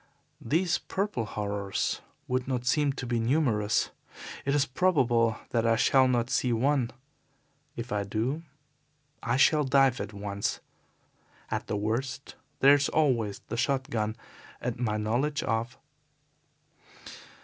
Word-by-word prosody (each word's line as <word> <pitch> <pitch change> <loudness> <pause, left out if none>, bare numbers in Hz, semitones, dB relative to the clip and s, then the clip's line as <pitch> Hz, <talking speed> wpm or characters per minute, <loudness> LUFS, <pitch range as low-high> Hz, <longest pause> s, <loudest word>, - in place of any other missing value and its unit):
These 170 +8 +1
purple 195 - -2
horrors 100 -1 -2 0.3
would 125 0 -1
not 125 -2 -2
seem 145 +2 +2
to 135 - -6
be 120 -1 0
numerous. 115 -4 +1 0.5
It 140 +1 +1
is 145 -1 +3
probable 125 -8 +2
that 115 -2 +1
I 115 - +4
shall 130 +2 +4
not 120 -1 0
see 125 - +1
one. 130 +1 +2 0.9
If 120 +1 -6
I 105 -1 0
do 115 +9 -2 0.8
I 120 +2 0
shall 150 +2 +5
dive 135 -2 +3
at 100 +1 -5
once. 100 -1 -3 0.9
At - - -2
the 105 - -1
worst 125 +6 -3 0.3
there 140 +1 +8
is 145 0 +2
always 120 -10 +1
the 115 - -3
shot 135 +1 0
gun 110 -1 -1 0.4
and 125 -1 -3
my 110 -3 0
knowledge 120 +8 0
of 115 +2 -2
125 Hz, 135 wpm, -28 LUFS, 110-140 Hz, 0.9 s, there